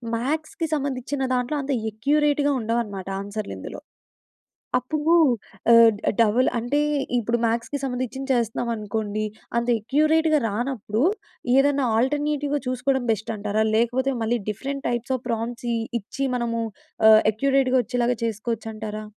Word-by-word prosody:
మ్యాథ్స్‌కి 310 - -2
సంబంధించిన 275 -1 -2
దాంట్లో, 250 +4 -1
అంత 275 - -3 0.2
అక్యురేట్‌గా 290 +5 +2
ఉండవన్నమాట. 220 -4 -2
ఆన్సర్‌లు 205 +1 -5
ఇందులో. - - -8 1.0
అప్పుడు 300 +6 0 0.6
ఆహ్, 230 -1 +8 0.3
డబుల్ 230 +3 +3
అంటే, 245 +6 0 0.4
ఇప్పుడు 235 +1 0
మ్యాథ్స్‌కి 230 +5 -1
సంబంధించింది 265 +1 -3
చేస్తున్నాం 235 0 -1
అనుకోండి, 215 0 -3 0.3
అంత 235 0 0
అక్యురేట్‌గా 310 +5 +3
రానప్పుడు 225 0 -2 0.5
ఏదన్నా 280 0 +3
ఆల్టర్నేటివ్‌గా 290 +3 0
చూసుకోవడం 255 0 0
బెస్ట్ 220 +1 -2
అంటారా? 210 +1 0
లేకపోతే, 245 +4 +1
మళ్ళీ 235 +2 0
డిఫరెంట్ 275 +6 -4
టైప్స్ 245 +2 -2
ఆఫ్ 250 - -19
ప్రాంప్ట్స్ 235 +1 -3
ఇ - - 0 0.2
ఇచ్చి 270 +7 -4
మనము 230 -1 -1 0.5
ఆహ్, 215 0 +8
అక్యురేట్‌గా 265 +2 +2
వచ్చేలాగా 245 +2 0
చేసుకోవచ్చంటారా? 220 -1 -4
245 Hz, 120 wpm, -24 LUFS, 225-275 Hz, 1.0 s, ఆహ్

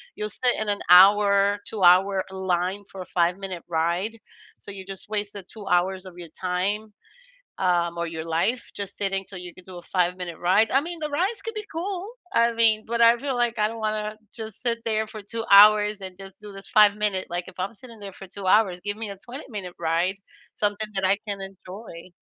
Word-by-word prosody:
you'll 210 - -4
sit 245 +4 +2
in 215 - -1
an 205 0 0
hour, 200 +2 +6
two-hour 190 -1 +4
line 190 +1 -1
for 190 - -8
a - - -7
five-minute 180 +1 -1
ride. 175 +7 -1 0.4
So 200 - -9
you 195 -1 -9
just 195 +1 -10
wasted 205 -2 -4
2 210 -3 -11
hours 185 +1 +1
of 185 - -10
your 175 -2 -9
time, 200 +4 -2 0.6
um, 170 -1 +1
or 170 - -1
your 160 -1 -6
life 170 +10 -1
just 200 -1 -6
sitting 195 -1 -1
till 190 - -7
you 180 -1 -8
could 185 - -15
do 185 -1 -10
a - - -8
five-minute 180 -2 -1
ride. 190 +5 +3
I 270 - +4
mean, 340 +2 -6
the 305 -1 -3
rides 370 +10 -1
could 455 -1 -5
be 425 -1 -5
cool. 370 +3 -4 0.2
I 235 0 +4
mean, 225 -2 +3
but 235 +1 -2
I 230 0 +7
feel 270 +1 -3
like 240 -1 0
I 210 - +3
don't 225 0 -7
wanna 215 0 -2 0.2
just 220 -3 -8
sit 235 -2 0
there 220 -1 0
for 215 0 -9
2 225 +3 -5
hours 210 0 +7
and 185 -1 -7
just 195 0 -12
do 210 -1 -10
this 195 0 -11
five-minute 210 -2 +3
like, 175 0 -3
if - - -12
I'm 190 +4 -2
sitting 230 +1 -13
there 200 -1 -7
for 195 - -11
2 195 +1 -8
hours, 185 -3 +3
give 205 0 -3
me 220 -1 -5
a 200 - -6
twenty-minute 215 - -8
ride, 170 +4 0 0.4
something 205 +1 -1
that 195 0 0
I 195 +1 +3
can 200 -2 -4
enjoy. 190 -1 -10
200 Hz, 210 wpm, -25 LUFS, 185-220 Hz, 0.6 s, I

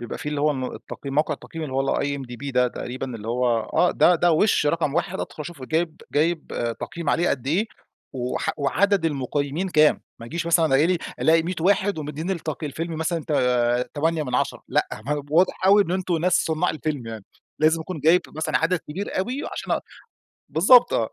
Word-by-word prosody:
بيبقى 120 - -6
في - - -5
اللي 150 -1 -2
هو 150 +1 +3
ال 130 -3 -3
التقييم 140 -2 -8
موقع 150 +2 +1
التقييم 165 -1 -9
اللي 140 - -6
هو 135 0 +1
IMDB 140 -1 -4
ده 125 0 +3
تقريبًا، 125 +2 -5
اللي 110 0 -8
هو 125 +2 0
آه، 175 +9 +1
ده 180 - +4
ده 175 0 +3
وش 160 -1 +3
رقم 150 -2 0
واحد 190 +2 -1
أدخل - - -7
أشوفه 150 -3 -8
جايب 160 +1 -1
جايب 160 +2 +1 0.3
تقييم 170 -4 -3
عليه 175 +4 +2
قد 130 -2 -2
إيه 180 +10 +1 0.5
وح 125 -1 -2
وعدد 195 +6 +2
المقيمين 145 +3 -1
كام، 155 -3 +4 0.2
ما 115 - -9
ييجيش 170 +7 -4
مثلًا 170 -1 +4 0.2
الاق 175 0 +2 0.2
ألاقي 165 +1 +4
100 175 +3 -3
واحد 195 0 +2
ومديين 150 +4 -4
التقي 160 -4 -3
الفيلم 165 +4 -4
مثلًا 160 -1 -1
ت - - -1 0.6
تمانية 160 +1 0
من 125 -4 -4
10 - - -1
لأ، - - +1 0.4
واضح 180 +3 +2
أوي 200 +2 +7
إن 175 - -6
أنتم 185 -1 0
ناس 180 +3 +1
صناع 160 +3 +1
الفيلم 150 -5 -4
يعني، 110 -3 -7 0.3
لازم 160 +2 +3
يكون 160 0 -6
جايب 165 +4 +5
مثلًا 155 +1 -1
عدد 175 +2 +1
كبير 180 +7 -5
أوي 250 +9 -2
عشان - - -3
اق - - 0 0.7
بالضبط 240 +9 +6
آه، 115 - +1
160 Hz, 195 wpm, -24 LUFS, 140-175 Hz, 0.7 s, أوي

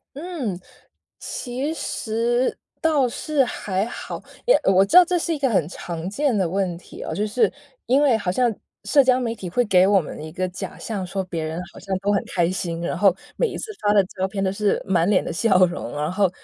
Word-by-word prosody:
嗯。 285 - -4 0.6
其 255 +5 -4
实 240 -3 -1 0.3
倒 300 -5 +3
是 285 +4 0
还 200 -4 -2
好， - - -7 0.2
也 - - +6
我 195 0 +5
知 195 - -4
道 365 - +12
这 355 +1 0
是 335 0 -1
一 - - -4
个 275 -1 +2
很 195 -10 +2
常 170 -1 -6
见 275 +2 +1
的 190 -3 +2
问 185 -1 -1
题 175 - -12
哦， - - -4
就 210 - 0
是 215 +4 +2 0.4
因 265 +4 +4
为 280 -5 +4
好 195 -4 -2
像 235 +4 +1 0.3
社 285 - +5
交 255 -1 +3
媒 235 -3 -2
体 195 -5 -7
会 245 +8 +1
给 185 -4 +5
我 200 -1 +5
们 150 - -8
一 155 - -7
个 185 +3 -2
假 180 - -7
象 200 -5 -4
说 190 +1 -3
别 170 -3 -4
人 160 +1 -3
好 - - -12
像 195 -1 -2
都 200 +1 +1
很 200 - +1
开 175 -1 +1
心， 170 -2 -3
然 170 - -2
后 195 -3 +4 0.2
每 - - +2
一 - - -6
次 435 - -6
发 205 0 +3
的 200 -2 +5
照 190 +1 -3
片 195 0 -2
都 190 - +1
是 205 +1 +1
满 180 -3 +2
脸 205 -2 +3
的 - - -4
笑 185 +1 +4
容。 170 -8 -5
然 150 +3 -1
后 195 -1 +2
200 Hz, 245 characters per minute, -23 LUFS, 185-250 Hz, 0.6 s, 道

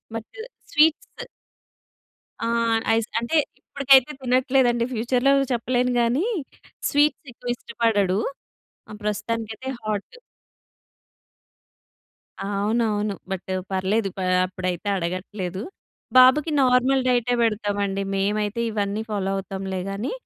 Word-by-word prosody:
But 225 - -6 0.4
sweets 320 +10 +2 1.2
ఆ! 230 - -1 0.5
Ice. 225 -1 0
అంటే, 235 +7 -2 0.3
ఇప్పుడుకైతే 275 0 +4
తినట్లేదండి, 250 -1 +2
ఫ్యూచర్‌లో 245 +4 +2 0.2
చెప్పలేను 250 +1 0
గానీ. 250 - +1 0.6
స్వీట్సెక్కువ 275 -4 0
ఇష్టపడడు. 210 -5 0 0.7
ఆ! - - -8
ప్రస్తుతానికైతే 220 +4 -3
హాట్. 215 - -4 2.3
అవునవును. 205 +1 0 0.2
బట్ 190 0 -4 0.2
పర్లేదు. 195 +2 0
పా 185 - -2 0.2
అప్పుడైతే 185 +1 -4
అడగట్లేదు. 185 +1 -4 0.6
బాబుకి 275 +5 +6
నార్మల్ 255 +1 +3
డైటే 245 0 +2
బెడతామండి, 205 -3 0
మేమైతే 205 +3 0
ఇవన్నీ 205 0 -1
ఫాలో 195 -2 -1
అవుతాంలే 190 -1 -4
గానీ. 200 +5 -3
220 Hz, 90 wpm, -23 LUFS, 200-250 Hz, 2.3 s, బాబుకి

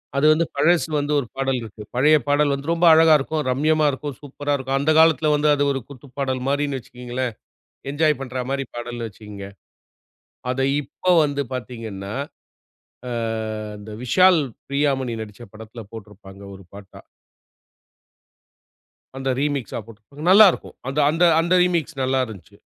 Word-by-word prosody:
அது 140 +2 +2
வந்து 165 +2 +1
பழசு 165 +5 +3
வந்து 145 +1 -2
ஒரு 130 - -5
பாடல் 135 -1 -1
இருக்கு. 110 -1 -10
பழைய 150 +5 +5
பாடல் 145 0 +2
வந்து 140 +4 -3
ரொம்ப 170 +1 +1
அழகா 160 0 +6
இருக்கும். 155 +3 -2
ரம்யமா 155 +4 +2
இருக்கும். 140 +1 -6
சூப்பரா 145 0 -4
இருக்கும். 135 0 -2
அந்தக் 155 +3 +2
காலத்துல 160 -1 +4
வந்து 150 +1 +2
அது 145 - 0
ஒரு 135 - -2
குத்துப்பாடல் 130 -1 -5
மாரினு 140 -1 0
வச்சீக்கங்களேன். 125 0 -5 0.6
என்ஜாய் 150 -1 +1
பண்ற 130 -1 -4
மாரி 135 0 -2
பாடல் 120 0 -5
வச்சீக்கங்க. 105 -2 -10 1.0
அத 130 +1 -2 0.2
இப்ப 145 +6 -7 0.2
வந்து 145 -1 -1
பார்த்தீங்கன்னா? 110 -5 -6 1.0
அ, - - -5 0.7
அந்த 105 +1 -11
விஷால், 180 +7 +5 0.3
பிரியா 140 +1 +1
மணி 125 -3 -3
நடிச்ச 105 +1 -10
படத்துல 110 +2 -10
போட்டுருப்பாங்க. 100 -3 -12
ஒரு 95 - -14
பாட்டா 100 -1 -12 2.2
அந்த 135 0 -3
ரீமிக்ஸ்சா 140 -5 -2
போட்ருப்பாங்க. 115 +7 -13
நல்லா 205 +2 +9
இருக்கும். - - -10
அந்த 135 +3 -2
அந்த 165 +3 +1 0.2
அந்த 170 +2 +2
ரீமிக்ஸ் 170 -6 -1
நல்லா 130 +1 +1
இருந்துச்சு. 95 -7 -13
135 Hz, 145 wpm, -22 LUFS, 120-150 Hz, 2.2 s, நல்லா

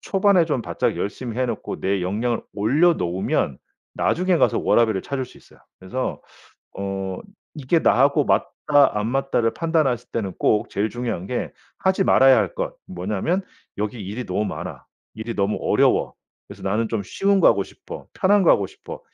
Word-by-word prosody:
초반에 195 -3 +3
좀 135 -7 -1
바짝 - - -1
열심히 115 +3 -4
해 130 - +1
놓고 - - -4
내 95 -1 0
역량을 110 +6 -1
올려 145 +12 +3
놓으면 90 - -1 0.4
나중에 180 0 +1
가서 - - +2
워라밸을 110 -5 +2
찾을 135 -2 -3
수 125 - -16
있어요. - - -22 0.2
그래서 110 +8 -4 0.6
어 95 -1 -3 0.4
이게 150 +2 +1
나하고 140 +1 +3
맞다 145 -7 +2
안 105 - -1
맞다를 135 -3 0
판단하실 155 -8 0
때는 100 -5 -2
꼭 105 - +2
제일 105 +2 -1
중요한 120 -7 -4
게 125 - -3 0.3
하지 190 +1 +2
말아야 135 -5 +6
할 100 -4 -1
것 - - -3
뭐냐면 105 - -2 0.4
'여기 105 +2 -3
일이 105 +6 -5
너무 95 +3 -1
많아. - - -6 0.3
일이 110 +1 -5
너무 100 +1 0
어려워. - - +2 0.3
그래서 - - -12
나는 110 +4 0
좀 110 -2 -2
쉬운 195 - +1
거 - - +5
하고 - - +3
싶어. - - -11
편한 200 +1 +3
거 - - +6
하고 100 - +3
싶어.' - - -10
120 Hz, 340 characters per minute, -22 LUFS, 100-145 Hz, 0.6 s, 말아야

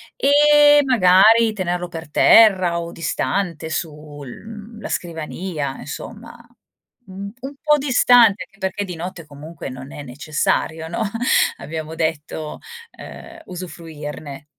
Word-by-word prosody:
E 295 - +5
magari 225 0 +5
tenerlo 180 -3 -3
per 165 -3 -9
terra 185 -4 +5
o 170 0 -6
distante 165 0 -2
sul, 150 -3 -6
mhmm, 215 - -11
la - - -6
scrivania, 160 -3 -4
insomma. 230 +9 -9 0.7
Mhmm, 195 +1 -8
un 270 +2 -8
po' 300 -1 +3
distante, 245 -6 +4
anche 195 - -21
perché 190 +1 -3
di 180 - -7
notte 170 0 -7
comunque 150 +2 -9
non 130 +1 -9
è 145 - -8
necessario, 155 +4 -2
no, 170 +6 -4 0.6
abbiamo 160 +1 -6
detto, 155 -1 -4 0.3
ehm, 335 - -12
usufruirne. 155 - -8
175 Hz, 120 wpm, -20 LUFS, 155-215 Hz, 0.7 s, E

